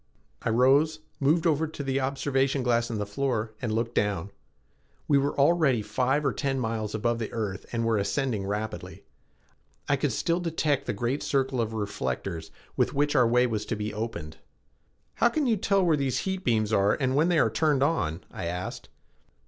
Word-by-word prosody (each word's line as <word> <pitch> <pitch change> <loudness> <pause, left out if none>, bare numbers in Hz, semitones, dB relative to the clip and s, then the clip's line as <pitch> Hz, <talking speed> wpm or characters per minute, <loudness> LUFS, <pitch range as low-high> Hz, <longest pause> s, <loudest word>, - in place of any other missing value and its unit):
I - - -1
rose, 140 +7 +3 0.2
moved 155 +4 +2
over 160 -1 +2
to 155 -2 -6
the 135 0 0
observation 135 0 0
glass 120 -1 +1
in 115 - -3
the 105 - -2
floor, 110 0 -2
and 120 -4 -2
looked 115 +2 -1
down. 100 -3 0 0.8
We 140 -2 +4
were 140 +1 -1
already 140 -6 +3
five 130 +7 0
or 135 - +2
ten 135 -2 -1
miles 110 -3 -2
above 115 +2 0
the 110 - -4
earth 105 -4 -4
and 115 -1 -1
were 115 -2 +2
ascending 110 -2 -1
rapidly. 105 +2 -4 0.8
I - - +2
could - - 0
still 170 +1 0
detect 155 -5 0
the - - 0
great 120 +7 -1
circle 135 -3 0
of 110 -1 -2
reflectors 85 - -3 0.3
with - - +1
which 145 +1 +1
our 125 -4 +5
way 125 +2 +4
was 110 -4 -1
to 115 - -1
be 105 0 -4
opened. 105 -8 -5 0.8
"How 235 - +4
can 295 +4 0
you 235 -3 +3
tell 195 -1 +2
where 165 -3 +4
these 135 -3 0
heat 190 -1 -3
beams 110 -3 +1
are 100 0 +3
when 140 +4 +2
they 175 - +3
are - - +3
turned 150 -4 +2
on?" 100 - 0
I 90 - -5
asked. 90 +2 -5
125 Hz, 190 wpm, -27 LUFS, 110-145 Hz, 0.8 s, our